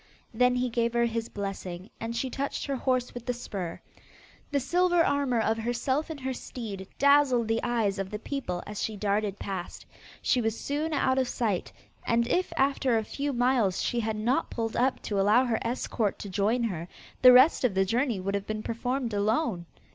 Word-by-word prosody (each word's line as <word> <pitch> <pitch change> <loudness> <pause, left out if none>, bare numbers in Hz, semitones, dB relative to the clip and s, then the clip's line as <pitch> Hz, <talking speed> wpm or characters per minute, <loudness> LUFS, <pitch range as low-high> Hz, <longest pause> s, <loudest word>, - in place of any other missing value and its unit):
Then 250 +2 +3
he 250 0 +1
gave 235 0 0
her 235 0 +3
his 230 -1 -2
blessing, 195 -1 -6
and 230 +1 -4
she 255 +2 -2
touched 280 +2 -3
her 275 - -2
horse 255 -1 0
with 245 0 -8
the 245 - 0
spur. 195 -7 -5 0.7
The 285 - +1
silver 350 +4 +3
armour 280 -4 +1
of 225 0 +1
herself 250 +6 -1
and 315 -3 -6
her 260 0 -2
steed 210 -6 -7
dazzled 280 -4 +4
the 225 0 +1
eyes 215 -5 0
of 195 -1 -3
the 210 - -4
people 210 -7 -4
as 210 -1 -5
she 220 -2 -2
darted 205 0 0
past. 190 -4 -6 0.3
She 250 - +2
was 225 0 -1
soon 300 +3 -2
out 265 -3 +2
of 260 - +1
sight, 215 -8 -1 0.3
and 235 0 +1
if 365 +8 0
after 270 -3 +2
a 220 - 0
few 285 +6 -3
miles 245 -6 +2
she 240 - 0
had 220 -1 -1
not 230 +5 0
pulled 225 -2 -3
up 260 +2 +1
to 205 -2 -1
allow 215 +6 +4
her 235 -3 0
escort 230 -3 -1
to 200 - -7
join 210 +6 +1
her, 175 -7 -3 0.3
the 255 - +10
rest 260 +5 +6
of 235 -7 +2
the 190 0 +3
journey 235 +1 0
would 195 +2 -2
have 200 0 -2
been 215 0 -3
performed 245 +1 -2
alone. 205 - 0
235 Hz, 200 wpm, -28 LUFS, 210-260 Hz, 0.7 s, the